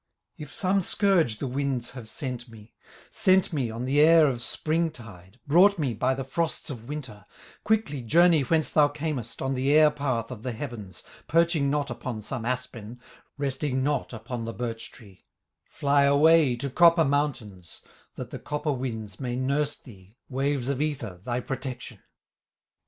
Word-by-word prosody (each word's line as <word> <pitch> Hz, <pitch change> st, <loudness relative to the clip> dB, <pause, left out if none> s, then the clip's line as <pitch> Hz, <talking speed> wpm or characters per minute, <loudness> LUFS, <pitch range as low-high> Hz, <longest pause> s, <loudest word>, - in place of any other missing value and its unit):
"If 150 Hz, -2 st, -10 dB
some 195 Hz, +1 st, +1 dB
scourge 175 Hz, -, +2 dB
the -, -, -4 dB
winds 135 Hz, -2 st, -2 dB
have 125 Hz, -4 st, -9 dB
sent 125 Hz, -1 st, -5 dB
me, 110 Hz, -1 st, -15 dB, 0.4 s
Sent 185 Hz, -2 st, +3 dB
me 135 Hz, -6 st, -1 dB
on 115 Hz, +3 st, -5 dB
the 140 Hz, +3 st, +1 dB
air 160 Hz, +1 st, +7 dB
of 125 Hz, -4 st, -1 dB
spring 160 Hz, +7 st, 0 dB
tide, 110 Hz, -, -13 dB
Brought 185 Hz, +7 st, +5 dB
me 140 Hz, -7 st, -1 dB
by 125 Hz, +4 st, 0 dB
the 135 Hz, -, -4 dB
frosts 160 Hz, +3 st, -3 dB
of 115 Hz, -3 st, -9 dB
winter, 130 Hz, -9 st, -7 dB, 0.4 s
Quickly 215 Hz, -, 0 dB
journey 165 Hz, +6 st, +4 dB
whence 155 Hz, +4 st, +2 dB
thou 150 Hz, -1 st, +5 dB
camest, 145 Hz, -6 st, -4 dB
On 135 Hz, 0 st, -1 dB
the 135 Hz, +2 st, 0 dB
air 155 Hz, 0 st, +6 dB
path 130 Hz, -6 st, -2 dB
of 120 Hz, -4 st, -8 dB
the 125 Hz, +1 st, -4 dB
heavens, 110 Hz, -6 st, -8 dB, 0.2 s
Perching 165 Hz, -3 st, +2 dB
not 145 Hz, -2 st, -1 dB
upon 120 Hz, -2 st, -5 dB
some 120 Hz, +1 st, -5 dB
aspen, 125 Hz, -2 st, -5 dB, 0.4 s
Resting 135 Hz, -1 st, -1 dB
not 145 Hz, -1 st, -1 dB
upon 115 Hz, 0 st, -6 dB
the 115 Hz, -, -5 dB
birch 115 Hz, -2 st, -5 dB
tree; 100 Hz, -6 st, -17 dB, 0.4 s
Fly 140 Hz, 0 st, +2 dB
away 145 Hz, -1 st, +5 dB
to 135 Hz, +3 st, -4 dB
copper 170 Hz, +2 st, +5 dB
mountains, 130 Hz, -, -3 dB, 0.3 s
That -, -, -7 dB
the -, -, -6 dB
copper 150 Hz, +1 st, -3 dB
winds 110 Hz, -6 st, -5 dB
may 125 Hz, -2 st, -3 dB
nurse 140 Hz, +3 st, 0 dB
thee, 100 Hz, -1 st, -17 dB
Waves 135 Hz, -1 st, -1 dB
of 140 Hz, 0 st, -1 dB
ether, 125 Hz, -12 st, -3 dB
thy 120 Hz, +2 st, -2 dB
protection. 130 Hz, -1 st, -6 dB
135 Hz, 165 wpm, -26 LUFS, 120-150 Hz, 0.4 s, air